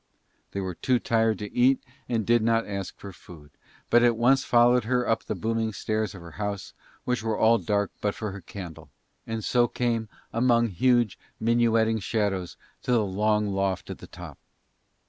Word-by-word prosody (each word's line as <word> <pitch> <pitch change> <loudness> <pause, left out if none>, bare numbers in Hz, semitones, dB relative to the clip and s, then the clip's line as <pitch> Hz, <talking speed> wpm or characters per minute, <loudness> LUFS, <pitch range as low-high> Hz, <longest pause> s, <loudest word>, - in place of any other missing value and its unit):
They 100 - -5
were 95 -1 -3
too 125 +8 +1
tired 115 -2 +1
to 105 -1 -7
eat 130 +2 +4 0.3
and 115 -3 0
did 120 0 +4
not 115 0 +2
ask 100 -2 -5
for 100 -1 -9
food, 75 -5 -14 0.4
but 120 - +6
at 120 -2 +3
once 135 +3 +4
followed 120 0 +4
her 125 +1 +1
up 115 - 0
the - - -3
booming 115 0 -1
stairs 110 0 -2
of 95 - -10
her 85 0 -11
house, 100 -1 -4 0.3
which 125 -2 -1
were 110 -1 -1
all 115 +1 +4
dark 100 -1 0
but 105 -1 0
for 110 -5 -4
her 100 0 -8
candle, 80 -4 -9 0.4
and 115 -1 -3
so 120 -1 +3
came 115 -3 -1 0.2
among 120 0 +3
huge 120 +2 +2 0.2
minuetting 115 -1 +2
shadows 100 -4 -2 0.2
to - - -2
the 115 -3 +3
long 105 +1 +1
loft 95 -1 -1
at - - -8
the - - -11
top. - - -11
110 Hz, 185 wpm, -26 LUFS, 100-120 Hz, 0.4 s, but